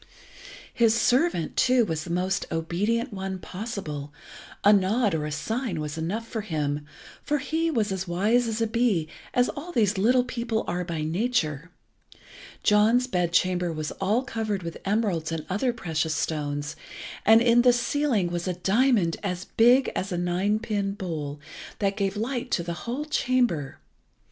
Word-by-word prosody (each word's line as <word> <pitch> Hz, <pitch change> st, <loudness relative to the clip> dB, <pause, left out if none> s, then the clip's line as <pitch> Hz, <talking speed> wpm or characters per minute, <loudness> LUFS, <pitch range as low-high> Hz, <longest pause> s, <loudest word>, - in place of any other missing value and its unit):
His 230 Hz, -1 st, +3 dB
servant, 250 Hz, -, +2 dB
too, 255 Hz, -2 st, +4 dB
was 160 Hz, -4 st, -3 dB
the -, -, -8 dB
most 185 Hz, +3 st, -1 dB
obedient 205 Hz, +9 st, -1 dB
one 190 Hz, -1 st, -4 dB
possible, 180 Hz, -8 st, -6 dB, 0.5 s
a 205 Hz, -, +7 dB
nod 205 Hz, +2 st, +2 dB
or 150 Hz, -2 st, -1 dB
a -, -, -5 dB
sign 225 Hz, -, -2 dB
was 150 Hz, 0 st, -4 dB
enough 190 Hz, +8 st, -3 dB
for 225 Hz, -2 st, -3 dB
him, 150 Hz, -6 st, -2 dB, 0.4 s
for 295 Hz, -, 0 dB
he 320 Hz, +4 st, -1 dB
was 225 Hz, -9 st, 0 dB
as 190 Hz, -1 st, -3 dB
wise 215 Hz, +8 st, +2 dB
as 225 Hz, 0 st, -2 dB
a -, -, +3 dB
bee, 220 Hz, -8 st, +1 dB, 0.3 s
as 245 Hz, 0 st, +4 dB
all 320 Hz, +5 st, -6 dB
these 210 Hz, -, +1 dB
little 245 Hz, +5 st, +4 dB
people 235 Hz, -3 st, -2 dB
are 180 Hz, +1 st, -2 dB
by 165 Hz, -3 st, -3 dB
nature 165 Hz, -, -1 dB, 0.9 s
John's 220 Hz, +4 st, +4 dB
bedchamber 180 Hz, -3 st, +1 dB
was 155 Hz, -1 st, -4 dB
all 210 Hz, +6 st, +2 dB
covered 215 Hz, -6 st, -3 dB
with 170 Hz, -1 st, -7 dB
emeralds 195 Hz, -6 st, 0 dB
and 160 Hz, -2 st, -3 dB
other 225 Hz, +7 st, +1 dB
precious 160 Hz, -8 st, -2 dB
stones, 145 Hz, -1 st, -2 dB, 0.5 s
and 220 Hz, +2 st, +7 dB
in 235 Hz, 0 st, +5 dB
the 250 Hz, 0 st, +6 dB
ceiling 240 Hz, -5 st, 0 dB
was 175 Hz, +1 st, -3 dB
a 180 Hz, -, 0 dB
diamond 195 Hz, -1 st, +2 dB
as 185 Hz, -2 st, -3 dB
big 245 Hz, +4 st, +4 dB
as 190 Hz, +2 st, -2 dB
a 175 Hz, -, -1 dB
nine 180 Hz, +4 st, +1 dB
pin 205 Hz, -3 st, -2 dB
bowl, 155 Hz, -7 st, -5 dB, 0.4 s
that 195 Hz, -1 st, 0 dB
gave 200 Hz, -1 st, -1 dB
light 245 Hz, +3 st, -2 dB
to 170 Hz, -, 0 dB
the 170 Hz, 0 st, -3 dB, 0.2 s
whole 275 Hz, +5 st, -2 dB
chamber. 245 Hz, -, 0 dB
200 Hz, 165 wpm, -26 LUFS, 170-235 Hz, 0.9 s, a